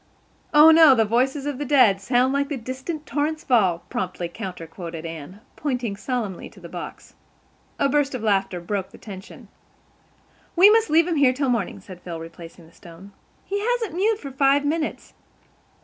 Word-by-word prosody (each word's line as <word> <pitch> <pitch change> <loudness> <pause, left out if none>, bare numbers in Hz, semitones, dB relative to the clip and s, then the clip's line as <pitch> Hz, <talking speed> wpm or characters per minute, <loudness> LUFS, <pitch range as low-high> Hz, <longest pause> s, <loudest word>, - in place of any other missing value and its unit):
"'Oh, 300 +2 +8
no, 320 -4 +7
the 225 -2 +3
voices 260 +6 0
of 290 -2 -3
the - - -2
dead 250 -9 +4
Sound 250 +4 +2
like 280 0 0
the 290 - -3
distant 260 +6 -6
torrent's 305 +2 -2
fall,'" 190 -9 +2
promptly 180 -1 -4
counter 180 -2 -7
quoted 165 -1 -8
Anne, 165 +5 -8
pointing 250 -7 -3
solemnly 215 -4 -4
to - - -17
the - - -10
box. - - -9 0.6
A - - +2
burst 275 -1 +1
of 235 - -5
laughter 195 -4 0
broke 190 +2 -3
the - - -15
tension. 195 -3 -11 1.1
"We 380 +4 +8
must 450 0 +3
leave 330 +2 +4
him 340 -3 -1
here 270 -3 +4
till 275 0 -1
morning," 225 -5 -1
said 185 -2 -12
Phil, 170 -2 -7
replacing 165 +1 -11
the 165 - -21
stone. 175 +4 -14 0.3
"He 405 - -2
hasn't 460 -4 -1
mewed 415 +5 +1
for 280 -9 -8
five 275 +2 +2
minutes. 305 +1 -3
255 Hz, 180 wpm, -23 LUFS, 190-295 Hz, 1.1 s, Oh